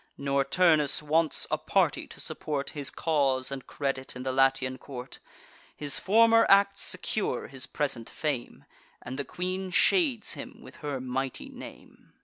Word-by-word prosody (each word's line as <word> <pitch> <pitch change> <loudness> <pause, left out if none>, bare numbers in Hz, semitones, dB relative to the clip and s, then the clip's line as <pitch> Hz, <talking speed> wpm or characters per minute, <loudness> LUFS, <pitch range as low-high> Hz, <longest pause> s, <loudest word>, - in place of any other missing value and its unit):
Nor 140 0 +1
Turnus 150 -2 +3
wants 155 +1 +2
a - - +1
party, - - +1
to - - -12
support 145 -2 -3
His 145 -3 -3
cause 140 -5 0
and 135 -2 -6
credit 135 -2 -3
in 125 - -6
the 130 - -1
Latian 130 -1 +2
court. 125 -2 -8 0.6
His 145 -2 0
former 230 +3 +5
acts 200 0 +5
secure 200 - -2
his 130 -2 -4
present 125 -6 -2
fame, 145 -6 -4 0.4
And 130 +3 -6
the - - 0
queen 185 +4 -4
shades 275 - +3
him - - -9
with - - -13
her 145 -3 -4
mighty 130 +1 -3
name. - - -13
140 Hz, 150 wpm, -28 LUFS, 130-180 Hz, 0.6 s, former